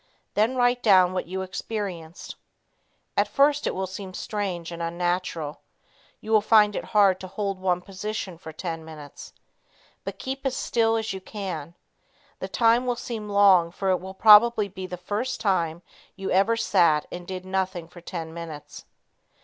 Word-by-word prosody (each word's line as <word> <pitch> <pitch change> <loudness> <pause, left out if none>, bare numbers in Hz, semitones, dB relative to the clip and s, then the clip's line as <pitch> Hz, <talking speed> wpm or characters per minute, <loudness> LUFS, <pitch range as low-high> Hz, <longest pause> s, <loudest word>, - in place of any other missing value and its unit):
Then 220 +5 +2
write 245 0 +2
down 185 -5 +5
what 185 - -3
you 190 +1 -3
experienced. 185 -4 -6 0.8
At - - +2
first 285 +1 +2
it - - -2
will 190 +1 -1
seem 185 0 -8
strange 185 -6 -4
and 170 0 -6
unnatural. 170 -2 -2 0.6
You 220 - -6
will 215 -1 +5
find 210 -1 +5
it - - -3
hard 200 -4 +4
to 185 - -7
hold 195 0 -3
one 180 -1 0
position 195 -2 -5
for 160 - -9
ten 165 0 -5
minutes. 155 -3 -11 0.7
But - - -6
keep 270 +1 -5
as 265 -2 -1
still 225 -1 +1
as 220 -2 -2
you 190 - -6
can. 180 -6 -6 0.6
The - - -4
time 235 +2 +3
will 245 - +1
seem 220 -3 -6
long 195 -4 +5
for 190 +2 -1
it 185 - +2
will 190 +1 -8
probably 215 +1 +7
be 190 -1 -7
the 180 - -6
first 210 +8 -3
time 170 -4 0 0.3
you 195 -1 -4
ever 200 +5 +3
sat 170 -9 +3
and 175 0 -7
did 185 -1 -6
nothing 185 -3 -2
for 175 +1 -14
ten 165 -2 -6
minutes. 165 -3 -9
190 Hz, 170 wpm, -25 LUFS, 175-215 Hz, 0.8 s, probably